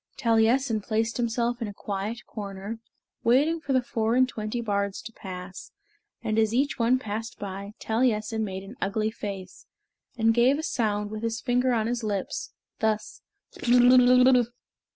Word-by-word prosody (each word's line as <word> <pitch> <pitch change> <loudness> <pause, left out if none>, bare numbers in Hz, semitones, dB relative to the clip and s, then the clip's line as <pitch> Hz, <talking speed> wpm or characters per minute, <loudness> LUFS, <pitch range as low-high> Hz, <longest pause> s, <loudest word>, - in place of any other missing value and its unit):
Taliessin 230 0 +2
placed 225 +2 -1
himself 240 0 -1
in 225 - -1
a 205 - -8
quiet 205 +4 -4
corner, 200 +1 -6 0.4
waiting 285 +8 +3
for 285 - -4
the 260 -1 +3
four 225 -1 0
and 255 0 +5
twenty 215 -1 -4
bards 200 -3 -1
to 225 - -9
pass, 185 -1 -8 0.5
and 220 -1 0
as 220 +1 +2
each 275 +1 +1
one 235 +2 +4
passed 225 -1 -5
by, 200 +1 -6
Taliessin 220 -1 0
made 190 -2 -4
an 200 +5 -10
ugly 215 +2 0
face, 195 -4 -7 0.5
and 225 0 +4
gave 245 +4 +4
a 315 - -4
sound 210 -7 -1
with 215 0 -5
his 230 0 -2
finger 250 +1 +1
on 225 -3 +1
his 240 +1 -2
lips, 205 -3 -3 0.3
thus, 215 -1 -1 0.4
"Blerwm, 250 +1 +6
Blerwm." 250 -2 +5
225 Hz, 160 wpm, -26 LUFS, 210-245 Hz, 0.5 s, Blerwm